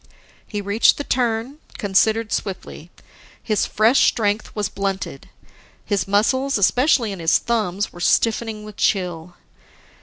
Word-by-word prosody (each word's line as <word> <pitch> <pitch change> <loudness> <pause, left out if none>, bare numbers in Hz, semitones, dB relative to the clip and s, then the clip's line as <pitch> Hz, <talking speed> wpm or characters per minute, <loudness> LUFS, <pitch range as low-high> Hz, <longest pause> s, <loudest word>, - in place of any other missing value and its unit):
He 205 - -4
reached 200 +3 +3
the 285 - -3
turn, 245 +2 -1 0.2
considered 215 +2 +1
swiftly. 185 -4 -5 0.5
His 215 -3 0
fresh 225 +5 +3
strength 210 -1 0
was 210 -2 -1
blunted; 195 -8 -4 0.6
his 200 -1 -1
muscles, 260 +7 +1
especially 245 +3 +2
in 195 - -7
his 165 -1 +3
thumbs, 210 -4 -2
were 175 - -11
stiffening 220 +4 +1
with 210 -1 -11
chill. 175 -3 -1
210 Hz, 125 wpm, -21 LUFS, 195-230 Hz, 0.6 s, reached